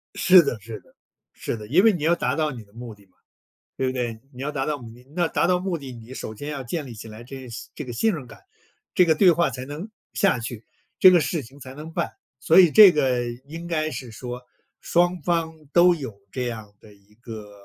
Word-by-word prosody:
是 185 -1 +7
的 130 -8 -3
是 110 +1 -8
的， - - -27 0.4
是 - - -4
的。 105 -1 -9
因 175 - +4
为 225 -2 +6
你 165 - -4
要 165 +2 +4
达 - - -1
到 155 -1 0
你 120 -5 -9
的 100 0 -26
目 115 -2 -9
的 100 -1 -22
嘛， 90 - -35 0.6
对 130 - -1
不 130 - 0
对？ 120 -3 -3
你 125 +2 -9
要 150 - -2
达 135 -2 -2
到 150 - -1
目 115 -3 -11
的， 125 +2 -17
那 175 -1 +1
达 170 - +1
到 180 0 +2
目 180 -2 -2
的， 135 -3 -9
你 115 +1 -12
首 110 - -6
先 145 +7 -6
要 140 -3 -4
建 145 +4 -4
立 120 - -9
起 110 +1 -10
来， 110 +2 -11
这 130 0 -9 0.3
这 150 - -6
个 120 - -7
信 220 - +1
任 150 -7 -6
感， 115 - -14 0.5
这 180 - +6
个 160 -2 +3
对 185 +1 +6
话 170 -2 +1
才 125 0 -6
能 150 +10 -7 0.2
下 195 -10 +2
去， 115 -1 -6 0.3
这 185 - +9
个 175 -2 +5
事 155 -1 -2
情 130 +5 -15
才 130 +1 -10
能 155 +3 -9
办。 - - -2 0.3
所 - - +6
以 175 -4 +6
这 205 -2 +9
个 130 -5 +1 0.2
应 165 +3 -8
该 155 -2 -1
是 125 -6 -7
说 125 +2 -7 0.4
双 175 0 +1
方 165 -1 0 0.2
都 175 0 +6
有 120 -10 -8
这 125 -1 -3
样 110 -3 -6
的 105 - -16
一 100 +1 -26
个， 110 -3 -10
135 Hz, 260 characters per minute, -24 LUFS, 115-170 Hz, 0.6 s, 这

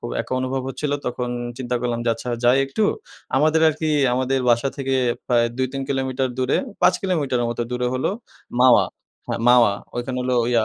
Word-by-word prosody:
খুব - - -6
একা - - -6
অনুভব 130 +1 -2
হচ্ছিলো 145 +1 -2
তখন 125 0 -2 0.3
চিন্তা 125 -1 -2
করলাম 120 -1 -2
আচ্ছা 115 +2 -8 0.2
যাই 125 +3 +5
একটু 210 +11 0 0.5
আমাদের 155 +3 +3
আরকি 155 +1 -2 0.3
আমাদের 130 +1 0
বাসা 120 +3 +2
থেকে 135 -1 -1 0.3
প্রায় 120 -1 +3
২-৩ 130 +1 -2
কিলোমিটার 130 -1 -1
দূরে, 130 +1 +1 0.3
৫ - - +5
কিলোমিটারের 140 -10 0
মতো 120 0 -2
দূরে 125 0 -1
হলো 130 - 0 0.5
মাওয়া। 130 -1 +6 0.4
হ্যাঁ, - - -2
মাওয়া 120 -4 +6 0.2
ওইখান 120 +2 -3
হলো 125 0 0 0.2
ইয়া, 115 -2 +3
130 Hz, 170 wpm, -22 LUFS, 120-135 Hz, 0.5 s, মাওয়া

